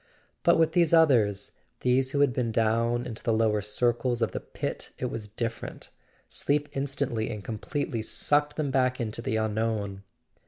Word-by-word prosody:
But - - +4
with 160 -1 +3
these 170 -3 +3
others, 115 -11 +4 0.3
these 130 +1 +2
who 140 +1 0
had 140 -3 +4
been 115 -1 -1
down 115 +2 +1
into 110 -2 -6
the 115 - 0
lower 110 -1 +2
circles 120 +3 0
of 115 - 0
the - - -3
pit, - - -5
it - - -3
was 110 -2 -5
different: 115 +2 -5 0.4
sleep 145 +1 0
instantly 135 -5 -2
and 105 -2 -5
completely 115 +2 -3
sucked 150 +6 +1
them 150 -3 -1
back 130 -1 +2
into 115 -1 -3
the 120 -2 -1
unknown. 110 -2 -1
120 Hz, 165 wpm, -28 LUFS, 110-135 Hz, 0.4 s, But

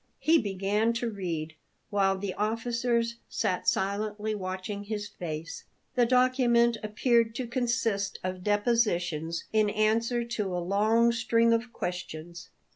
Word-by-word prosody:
He 325 +1 +4
began 205 +2 0
to 235 0 -2
read, 165 -6 -4 0.4
while 195 -1 +2
the 190 -1 -3
officers 235 +2 0
sat 180 - -1
silently 210 +2 0
watching 190 +1 -4
his 205 -1 -4
face. 165 -4 -6 0.3
The 245 -2 +3
document 250 -2 +4
appeared 225 +1 +2
to 255 - -2
consist 230 -5 -1
of 185 0 -4
depositions 180 -7 +1
in 215 -1 +3
answer 225 +3 +1
to 210 -6 -2
a - - -1
long 215 +6 +3
string 230 0 +3
of 230 +1 -1
questions. 175 -2 -6
215 Hz, 125 wpm, -28 LUFS, 190-235 Hz, 0.4 s, He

